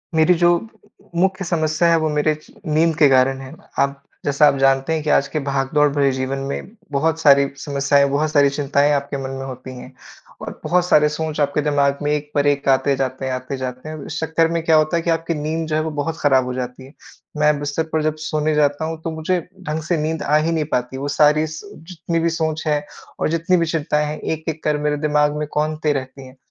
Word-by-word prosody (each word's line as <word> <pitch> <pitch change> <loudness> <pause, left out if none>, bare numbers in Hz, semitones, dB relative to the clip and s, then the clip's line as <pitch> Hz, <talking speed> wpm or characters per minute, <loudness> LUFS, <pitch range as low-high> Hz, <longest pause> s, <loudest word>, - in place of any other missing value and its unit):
मेरी 160 +3 +5
जो 175 0 +5 0.7
मुख्य 190 +2 +1
समस्या 160 0 +1
हैं 165 - +5
वो 160 -1 0
मेरे 150 +1 +1
च 155 - -19
नींद 160 +1 +2
के 150 - +6
कारण 130 0 +3
हैं। 135 0 -10 0.2
आप 140 0 0 0.2
जैसा 145 +1 +4
आप 140 - +3
जानते 135 +2 +2
हैं 160 -1 -2
कि 150 - -2
आज 140 - +3
के 155 - -3
भागदौड़ 140 +2 +2
भरे 140 -2 +2
जीवन 130 +1 -2
में - - -4 0.2
बहुत 160 +3 0
सारी 140 -3 +5
समस्याएँ 140 0 +2
बहुत 150 +2 0
सारी 145 -2 +4
चिंताएँ 140 0 +1
आपके 140 0 -2
मन 130 - -4
में 135 - -5
होती 130 0 -8
हैं, 125 - -10 0.5
और - - -7
बहुत 180 0 +2
सारे 150 -4 +4
सोच 155 0 -4
आपके 145 +1 +1
दिमाग 140 -1 +1
में 145 - 0
एक 150 0 -2
पर 145 0 +2
एक 140 -1 0
आते 135 +1 +3
जाते 130 0 -3
हैं, 130 - -2
आते 130 +2 -4
जाते 130 +2 -6
हैं। 155 -2 -7
इस - - -5
चक्कर 160 0 +1
में 170 0 0
क्या 160 - +4
होता 155 +2 +3
है - - 0
कि 170 - -1
आपकी 165 0 0
नींद 160 +2 -2
जो 155 - -1
है 155 - +1
वो 160 0 -3
बहुत 165 +2 -3
खराब 135 -3 +3
हो 125 - -4
जाती 125 +1 -6
है। 135 - -16 0.4
मैं 150 -1 +3
बिस्तर 145 +2 -2
पर 155 -1 +1
जब 155 0 0
सोने 155 0 0
जाता 145 +1 +1
हूँ 160 0 -5
तो 165 - -3
मुझे 160 +3 -1 0.2
ढंग 155 -2 -3
से 170 +1 0
नींद 155 +1 -2
आ 150 - +2
ही 155 +2 +1
नहीं 160 -2 0
पाती। 125 +1 -5
वो 140 - -4
सारी 150 +1 +4
स 160 +6 -9 0.2
जितनी 170 -1 -2
भी 170 +1 +1
सोच 160 -1 -2
है 150 -1 0 0.3
और - - 0
जितनी 165 +3 +1
भी 170 - +1
चिंताएँ 150 -2 0
हैं 150 +1 -5
एक-एक 160 0 -4
कर 150 -1 +1
मेरे 150 0 -1
दिमाग 150 0 +2
में 150 -1 -3
कौंधते 155 0 0
रहती 130 0 -6
हैं। 130 - -15
150 Hz, 235 wpm, -20 LUFS, 140-160 Hz, 0.7 s, के